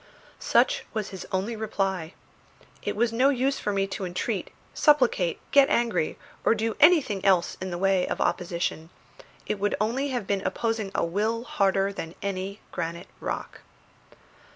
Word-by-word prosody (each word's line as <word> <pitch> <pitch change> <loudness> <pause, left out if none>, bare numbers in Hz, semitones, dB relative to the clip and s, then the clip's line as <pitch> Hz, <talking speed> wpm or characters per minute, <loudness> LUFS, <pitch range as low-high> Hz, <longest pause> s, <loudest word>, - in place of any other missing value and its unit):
Such - - +3
was 215 -2 -2
his 190 -2 -8
only 195 +5 -1
reply. 195 -6 -2 0.7
It - - -3
was 230 +2 +1
no 255 +4 +4
use 270 0 +1
for 210 - -1
me 195 -1 +1
to 195 0 -5
entreat, 180 0 -2 0.2
supplicate, 250 - +3
get 280 -1 +6
angry, 225 -9 +1 0.3
or - - +4
do 225 0 -1
anything 290 - +5
else 185 -3 +3
in 185 - -3
the 175 - -3
way 190 0 +2
of - - -3
opposition; 170 -2 -1 0.6
it 205 - -2
would 205 +1 +1
only 240 +6 0
have 245 -5 -2
been 200 0 0
opposing 225 -1 -1
a - - +2
will 215 +7 -1
harder 195 -3 +1
than 165 -3 -6
the 195 0 -3
granite 170 0 -4
rock. - - -5
200 Hz, 155 wpm, -26 LUFS, 185-230 Hz, 0.7 s, get